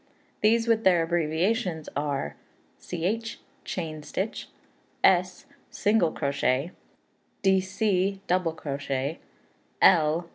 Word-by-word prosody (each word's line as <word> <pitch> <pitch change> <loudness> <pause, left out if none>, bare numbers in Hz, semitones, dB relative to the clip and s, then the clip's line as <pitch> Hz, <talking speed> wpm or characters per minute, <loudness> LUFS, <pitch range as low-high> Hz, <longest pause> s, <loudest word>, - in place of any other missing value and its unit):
These, 230 +2 +3
with 225 -1 +2
their 175 -3 +4
abbreviations, 170 +2 0
are: 145 -1 -2 0.4
Ch., 225 +7 -3 0.2
chain 155 -4 -5
stitch; 190 +7 -4 0.5
S., 185 +5 +3 0.2
single 205 -6 +2
crochet; 140 +2 0 0.7
Dc., 195 0 +1
double 180 -2 +1
crochet; 140 -1 -3 0.6
L. 165 -1 +4
175 Hz, 85 wpm, -27 LUFS, 155-195 Hz, 0.7 s, their